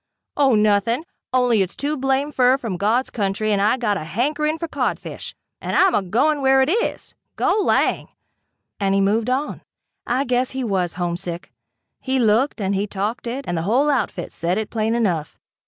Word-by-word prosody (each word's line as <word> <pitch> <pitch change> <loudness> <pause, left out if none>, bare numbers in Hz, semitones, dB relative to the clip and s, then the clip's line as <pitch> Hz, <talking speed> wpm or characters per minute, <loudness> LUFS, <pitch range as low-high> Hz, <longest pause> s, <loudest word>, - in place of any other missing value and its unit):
"Oh 275 -5 +4
nothing, 215 +5 +2 0.3
only 250 -4 +3
it's 185 -1 -2
too 295 +2 -1
blamed 270 +2 0
fur 255 0 +4
from 230 -8 -4
God's 220 +8 0
country 210 0 -1
and 200 -1 +2
I 215 +5 +3
got 225 -5 0
to 195 - -3
hankering 300 - -1
fer 335 - -4
codfish - - -3 0.3
and - - -3
I'm 385 -1 +5
agoin' 240 +10 +1
where 265 0 +4
it 280 - 0
is. 465 +5 -2 0.2
Go 425 - +2
lang!" - - +1 0.7
and 195 -1 +1
he - - +3
moved 215 +4 +1
on. 270 +4 -2 0.5
I 250 +3 +1
guess 255 0 -1
he 265 - -1
was 185 -7 -1
homesick. 175 0 -4 0.5
He 265 0 -1
looked, 235 +3 +2
and 195 -1 -1
he 200 +1 -1
talked 210 +5 -3
it 260 +4 -4
and 175 - -1
the 165 - -1
whole 255 - +2
outfit 215 -9 -2
said 175 +3 -1
it 220 -1 -3
plain 220 0 0
enough. 175 -10 -1
230 Hz, 185 wpm, -21 LUFS, 195-265 Hz, 0.7 s, I'm